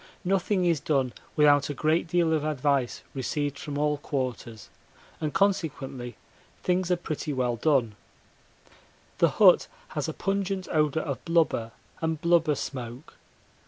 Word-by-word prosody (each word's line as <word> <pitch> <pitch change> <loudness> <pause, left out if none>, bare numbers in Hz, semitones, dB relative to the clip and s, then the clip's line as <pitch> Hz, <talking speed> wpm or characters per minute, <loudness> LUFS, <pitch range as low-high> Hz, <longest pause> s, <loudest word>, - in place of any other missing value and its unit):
Nothing 190 0 +1
is 170 -3 +2
done 135 -4 0 0.2
without 145 -2 +4
a 145 - -3
great 160 +3 +1
amount 170 -2 +3
of 155 -2 +1
advice 140 -4 0
received 145 +2 -2
from 145 -2 -5
all 150 0 +1
quarters, 125 -7 -4 0.5
and 155 -1 -2
consequently 140 - -1 0.5
things 180 0 +1
are 180 - +4
pretty 155 -2 -4
well 125 -3 0
done. 125 -3 +2 1.3
The - - +5
hut - - +5 0.2
has - - -3
a - - -4
pungent 195 -1 -2
odour 155 0 +1
of 140 -4 -4
blubber 165 -9 +1 0.3
and 160 -1 -1
blubber 170 -2 +3
smoke. 125 0 -6
150 Hz, 135 wpm, -27 LUFS, 135-170 Hz, 1.3 s, The